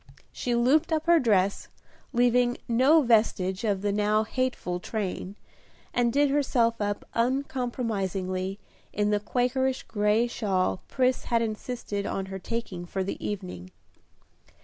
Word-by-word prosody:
She 245 -1 -2
looped 290 +8 +3
up 315 -1 0
her 340 -1 +6
dress, 200 -6 +1 0.4
leaving 245 0 +3
no 265 +7 +5
vestige 215 -5 +2
of 200 -3 0
the 205 - +1
now 210 +1 +2
hateful 235 -7 -2
train, 195 -1 -4 0.6
and 240 -1 +2
did 285 +2 +3
herself 245 -6 +1
up 205 0 -2
uncompromisingly 225 -7 -1 0.3
in 210 0 0
the 210 - +2
Quakerish 255 +4 0
gray 210 +2 +2
shawl 190 - -1
Pris 255 0 +1
had 230 -1 +1
insisted 215 -2 -4
on 195 - -2
her 190 - -4
taking 185 -4 -5
for 190 +2 -2
the 195 - -5
evening. 180 - -5
230 Hz, 130 wpm, -27 LUFS, 195-250 Hz, 0.6 s, her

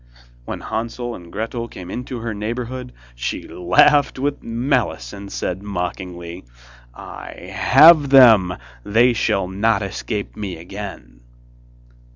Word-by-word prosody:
When - - -6
Hansel 120 +2 -4
and 85 -5 -11
Gretel 115 +3 -4
came 90 -5 -10
into 125 -1 -5
her 115 -1 -3
neighbourhood, 120 +4 -5 0.2
she - - -4
laughed 90 +13 +3
with 140 +2 -2
malice, 115 - -1
and 100 0 -9
said 90 +1 -3
mockingly: 90 -2 -5 0.5
'I - - -9 0.2
have 150 +1 +6
them, 110 -9 +6 0.3
they 120 +4 +3
shall 100 -4 0
not 100 +2 +1
escape 100 +2 -5
me 100 -5 -5
again! 85 -10 -9
105 Hz, 120 wpm, -20 LUFS, 90-120 Hz, 0.5 s, have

